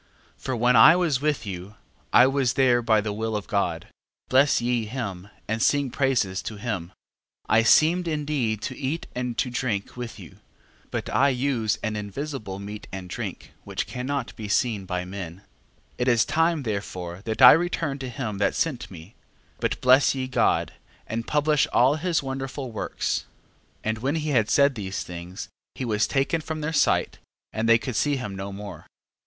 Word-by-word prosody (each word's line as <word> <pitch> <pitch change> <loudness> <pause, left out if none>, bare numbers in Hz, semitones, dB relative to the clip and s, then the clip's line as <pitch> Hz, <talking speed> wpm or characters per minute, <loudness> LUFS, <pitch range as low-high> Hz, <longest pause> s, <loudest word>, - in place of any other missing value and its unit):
12:18. - - -27
For 130 - -2
when 120 +2 +3
I 135 +9 +9
was 165 -7 +1
with 150 -5 0
you, 95 +1 -7 0.4
I 125 - +7
was 135 -2 +1
there 125 -2 +3
by 110 -2 +3
the 105 0 -3
will 110 +1 -2
of 105 - -3
God: 85 -5 -1 0.4
bless 135 +2 +4
ye 120 -2 0
him, 100 -6 -5 0.2
and 110 +1 -2
sing 140 0 +2
praises 120 -9 +1
to 110 - -6
him. 100 -5 -3 0.6
12:19. 110 - +3
I - - +5
seemed 165 +9 +4
indeed 145 -9 -1
to 130 - -4
eat 145 +5 -3
and 125 -1 -3
to 125 - 0
drink 120 -5 -2
with 120 -2 -6
you 90 -6 -12 0.5
but - - -4
I 140 +2 +4
use 125 -5 0
an 110 -1 -1
invisible 105 0 -5
meat 105 +1 -8
and 95 -1 -7
drink, - - -6
which - - -3
cannot 135 +3 -4
be 110 -3 -6
seen 105 -1 0
by 90 -1 -2
men. 90 -3 -6
12:20. 95 - -21 0.6
It 125 - 0
is 120 -2 +4
time 165 0 +1
therefore 95 -5 -4
that 110 +3 0
I 125 - +12
return 165 -4 +1
to 130 -1 -5
him 110 -5 -4
that 100 - +1
sent 145 -7 -1
me: 90 +3 -12 0.5
but - - -1
bless 130 +2 +5
ye 130 -1 -2
God, 130 - +1 0.3
and 115 +1 -4
publish 150 -1 +2
all 135 +5 +4
his 165 -2 0
wonderful 135 -1 -5
works. 110 - -2 0.6
12:21. - - -1
And 110 - -1
when 135 +6 -1
he 155 -1 -2
had 115 -7 +2
said 140 0 +4
these 100 -4 -4
things, 90 +3 -8 0.3
he 130 - -4
was 105 -2 +1
taken 140 +4 0
from 155 0 -5
their 155 +2 -2
sight, 145 - +2 0.3
and 115 +1 0
they 115 - +7
could 125 +1 -5
see 145 +4 +2
him 125 -7 -4
no 95 +1 -5
more. 100 -4 -9
120 Hz, 190 wpm, -25 LUFS, 105-140 Hz, 0.6 s, I